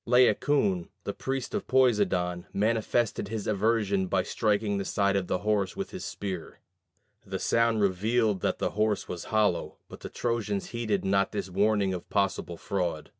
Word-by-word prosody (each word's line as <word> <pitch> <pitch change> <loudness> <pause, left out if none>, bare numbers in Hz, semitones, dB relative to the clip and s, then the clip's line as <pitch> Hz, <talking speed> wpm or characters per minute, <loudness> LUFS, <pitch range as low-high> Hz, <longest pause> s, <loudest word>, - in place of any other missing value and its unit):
Laocoon, 120 - +3
the - - -3
priest 135 -1 -3
of - - -3
Poseidon, 100 -9 +2
manifested 110 +1 0
his 110 -1 -4
aversion 105 -2 +1
by 95 0 +1
striking 105 0 0
the - - -1
side 100 0 +1
of 95 -2 0
the - - 0
horse 105 - 0
with 195 - -4
his 185 - -6
spear. 95 -5 -5 0.6
The 95 -1 -4
sound 115 +2 +2
revealed 105 +1 +1
that - - 0
the - - -1
horse 105 0 0
was 90 -2 -6
hollow, 105 -5 +1
but - - -11
the - - -7
Trojans 110 -4 -2
heeded 115 -5 -1
not 100 +2 +2
this 100 -3 -3
warning 100 0 +2
of 90 - -6
possible 95 -4 -1
fraud. 85 -6 -2
100 Hz, 165 wpm, -28 LUFS, 95-110 Hz, 0.6 s, Laocoon